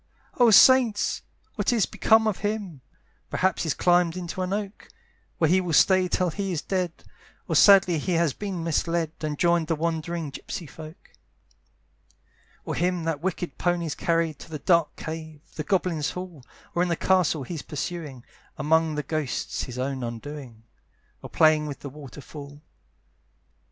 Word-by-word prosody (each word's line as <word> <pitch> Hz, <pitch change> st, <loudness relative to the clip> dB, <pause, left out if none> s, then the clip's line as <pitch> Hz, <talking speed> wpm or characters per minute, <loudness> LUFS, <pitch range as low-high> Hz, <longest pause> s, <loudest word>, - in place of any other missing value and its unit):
"Oh 240 Hz, -1 st, +7 dB
saints! 235 Hz, -1 st, +5 dB, 0.3 s
what -, -, 0 dB
is 230 Hz, -5 st, +2 dB
become 220 Hz, 0 st, +3 dB
of 215 Hz, -4 st, 0 dB
him? 205 Hz, -8 st, -3 dB, 0.5 s
"Perhaps 190 Hz, -1 st, 0 dB
he's 160 Hz, -4 st, -1 dB
climbed 175 Hz, -1 st, +2 dB
into 180 Hz, +1 st, -5 dB
an 185 Hz, 0 st, -2 dB
oak, 200 Hz, 0 st, -4 dB, 0.5 s
"Where 160 Hz, -, +3 dB
he 185 Hz, +4 st, +3 dB
will 175 Hz, -3 st, -3 dB
stay 185 Hz, +3 st, +5 dB
till 180 Hz, 0 st, 0 dB
he 195 Hz, +3 st, -3 dB
is 165 Hz, -4 st, -3 dB
dead; 180 Hz, -3 st, -3 dB, 0.4 s
"Or -, -, -1 dB
sadly 190 Hz, -5 st, +6 dB
he 180 Hz, +5 st, -2 dB
has 165 Hz, -4 st, +2 dB
been 195 Hz, -5 st, -5 dB
misled, 165 Hz, 0 st, 0 dB
"And 150 Hz, -2 st, -3 dB
joined 170 Hz, -1 st, +2 dB
the 165 Hz, -, +1 dB
wandering 165 Hz, -1 st, -3 dB
gypsey 165 Hz, -, -7 dB
folk. 155 Hz, +4 st, -12 dB, 1.5 s
"Or -, -, -3 dB
him 180 Hz, -1 st, 0 dB
that 160 Hz, -3 st, -2 dB
wicked 175 Hz, -4 st, -3 dB
pony's 175 Hz, -3 st, 0 dB
carried 165 Hz, -3 st, 0 dB
"To -, -, -12 dB
the 155 Hz, -, -5 dB
dark 165 Hz, +1 st, +2 dB
cave, 160 Hz, -1 st, -7 dB
the 155 Hz, -, -4 dB
goblins' 170 Hz, -3 st, 0 dB
hall, 180 Hz, -7 st, -8 dB, 0.3 s
"Or 175 Hz, -, +1 dB
in 180 Hz, -, +1 dB
the 170 Hz, -, +1 dB
castle 170 Hz, -5 st, +2 dB
he's 155 Hz, +3 st, -6 dB
pursuing, 150 Hz, -5 st, -6 dB, 0.3 s
"Among 160 Hz, +1 st, +2 dB
the 150 Hz, -, -2 dB
ghosts, 155 Hz, -2 st, -3 dB
his 125 Hz, -1 st, -8 dB
own 130 Hz, +1 st, -2 dB
undoing; 120 Hz, -1 st, -7 dB, 0.6 s
"Or -, -, -9 dB
playing 155 Hz, -1 st, +3 dB
with 145 Hz, -, -7 dB
the 140 Hz, -, -6 dB
waterfall." 145 Hz, +1 st, -11 dB
165 Hz, 160 wpm, -25 LUFS, 150-180 Hz, 1.5 s, Oh